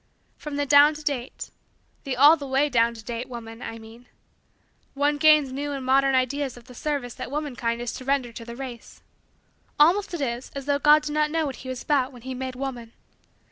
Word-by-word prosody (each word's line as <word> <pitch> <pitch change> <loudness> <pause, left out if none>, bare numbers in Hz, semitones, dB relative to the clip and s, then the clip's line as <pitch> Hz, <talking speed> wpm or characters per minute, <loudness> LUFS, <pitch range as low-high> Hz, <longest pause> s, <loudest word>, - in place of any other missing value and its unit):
From 300 -1 -7
the 285 0 0
down 290 +2 +6
to 305 - -9
date 270 -4 -4 0.5
the 265 -2 -3
all 290 +5 +8
the 285 -3 -8
way 270 +3 +2
down 235 -2 +2
to 225 - -11
date 240 +3 -5
woman, 230 -1 -9
I 230 - -6
mean 225 +2 -14 0.9
one 290 +1 +1
gains 305 -3 +5
new 285 +2 -3
and 270 -2 -5
modern 270 +1 +3
ideas 260 0 -1
of 240 - -13
the 250 +1 -14
service 275 -2 -3
that - - -7
womankind 250 -5 -3
is 240 -1 -4
to 255 - -8
render 270 -3 0
to 230 - -8
the 235 0 -9
race. 250 -2 -9 0.8
Almost 355 +5 +4
it 325 - -5
is 240 -1 -3
as 275 -1 -5
though 285 0 +1
God 300 +1 +6
did 300 0 -4
not 300 0 +2
know 320 0 0
what 275 -3 -5
he 260 - -9
was 255 -1 -5
about 275 -4 +1
when 245 -3 -14
he 260 0 -5
made 260 0 -5
woman. 250 -4 -6
270 Hz, 220 wpm, -25 LUFS, 245-290 Hz, 0.9 s, all